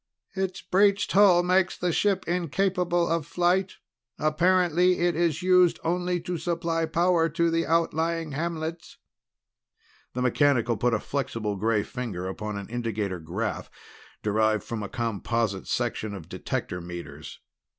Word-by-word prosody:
"Its 190 -1 -3
breached 200 +3 +2
hull 190 -3 +6
makes 185 +1 +2
the 180 -1 0
ship 195 0 +1
incapable 175 0 0
of 165 -1 0
flight. 180 +4 +1 0.4
Apparently 180 +3 +3
it 175 -1 +1
is 170 0 0
used 180 -1 +4
only 180 +1 0
to 170 0 -4
supply 165 0 -1
power 170 0 +2
to 170 +1 +1
the 165 0 0
outlying 165 0 0
hamlets." 165 +2 -4 1.2
The 125 - -2
mechanical 125 -2 +2
put 115 +2 +1
a - - -1
flexible 115 -7 -3
gray 105 +1 +1
finger 105 -8 -5
upon 105 +2 -5
an 100 - -6
indicator 110 -6 -3
graph 95 +8 -4 0.5
derived 110 0 +1
from 115 -2 -5
a 100 - -5
composite 115 -2 -2
section 110 -3 -2
of 85 -5 -9
detector 90 - -4
meters. 85 0 -8
165 Hz, 135 wpm, -26 LUFS, 115-175 Hz, 1.2 s, hull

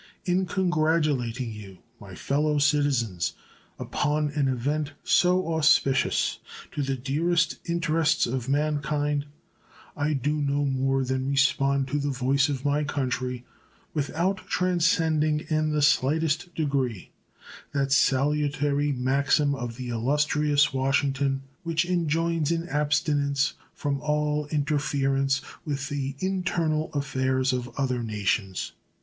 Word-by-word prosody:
In 185 +1 +1
congratulating 155 - 0
you, 100 -3 -10 0.2
my 95 -4 -11
fellow 150 +2 0
citizens, 140 - +1 0.4
upon 150 0 -1
an 145 -1 0
event 145 +4 -1
so 180 -2 +3
auspicious 150 -4 +2 0.3
to 145 - -3
the 135 -1 -1
dearest 165 +6 0
interests 165 -1 +1
of 125 +1 -3
man 150 +1 +1
kind 145 0 -1 0.7
I 150 +1 0
do 150 +2 -1
no 145 0 0
more 135 0 +1
than 130 +1 -1
respond 140 0 +2
to 145 +2 0
the 145 0 -1
voice 135 +2 +1
of 135 -2 -3
my 145 +1 +2
country, 125 -3 -2 0.5
without 170 +6 0
transcending 160 -4 +2
in 155 0 +2
the 150 -1 +1
slightest 155 +4 +1
degree 135 - -1 0.6
that 140 -2 -1
salutary 145 +1 +2
maxim 140 +2 +2
of 120 -4 -5
the 125 -1 -5
illustrious 145 +4 +2
Washington 135 0 0 0.2
which 165 -1 0
enjoins 165 -2 0
an 170 0 -1
abstinence 145 -1 +1 0.2
from 140 -2 -2
all 150 0 0
interference 140 -2 0 0.2
with 140 -2 -3
the 140 -1 -3
internal 170 -4 -1
affairs 130 -2 0
of 125 -1 -3
other 130 -3 0
nations. 105 -3 -2
145 Hz, 120 wpm, -26 LUFS, 135-155 Hz, 0.7 s, so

